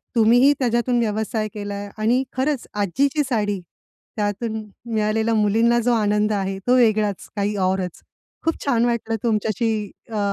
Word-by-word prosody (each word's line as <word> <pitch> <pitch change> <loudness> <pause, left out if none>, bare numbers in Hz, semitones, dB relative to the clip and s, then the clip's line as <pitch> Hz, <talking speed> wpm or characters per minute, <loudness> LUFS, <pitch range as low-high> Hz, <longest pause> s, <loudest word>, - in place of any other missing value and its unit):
तुम्हीही 245 +5 +5
त्याच्यातून 240 0 +1
व्यवसाय 220 0 -1
केलाय 205 -1 -5
आणि 240 +5 +2
खरंच 265 0 -1
आजीची 270 - +1
साडी, 205 -4 0 0.6
त्यातून 215 +2 -2 0.3
मिळालेल्या 220 +1 +1
मुलींना 225 +3 +3
जो 240 +1 +2
आनंद 210 -1 +2
आहे, 195 -1 -2
तो 250 - +5
वेगळाच 215 -5 +2
काही 205 +1 -1
औरच. 185 -2 -2 0.4
खूप 325 - -1
छान 240 -4 +2
वाटलं 235 -1 -1
तुमच्याशी 220 0 0 0.4
अ, 220 - -4
220 Hz, 135 wpm, -22 LUFS, 210-240 Hz, 0.6 s, तुम्हीही